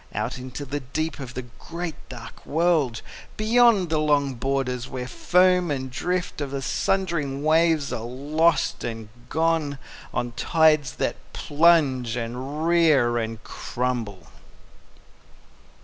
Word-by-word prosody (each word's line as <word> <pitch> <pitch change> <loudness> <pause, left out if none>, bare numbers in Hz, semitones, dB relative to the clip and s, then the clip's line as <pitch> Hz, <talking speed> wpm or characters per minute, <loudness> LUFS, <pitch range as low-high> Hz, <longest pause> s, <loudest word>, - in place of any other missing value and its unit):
Out - - -2
into 130 +3 -7
the 145 +2 -3
deep 155 +5 -3
of 130 -2 -7
the 130 - -4 0.2
great 170 -2 -7
dark 120 -1 -10
world, 155 -7 +1 0.3
Beyond 220 -4 +4
the 155 - +2
long 145 -3 +2
borders 125 0 -2
where 125 -1 -5
foam 180 +6 +3
and 130 -2 -3
drift 180 +4 -2
Of 140 - -2
the 135 0 -4
sundering 150 -5 -1
waves 160 -2 +3
are 120 - -3
lost 150 +7 +1
and 115 -2 -5 0.2
gone 160 -3 0 0.3
On 120 - -2
the - - -23
tides 155 -4 +3
that - - -1 0.2
plunge 145 -7 +3
and 130 +6 -4
rear 150 -9 +4
and 110 -1 -5
crumble. 120 -7 -4
145 Hz, 130 wpm, -24 LUFS, 125-165 Hz, 0.3 s, Beyond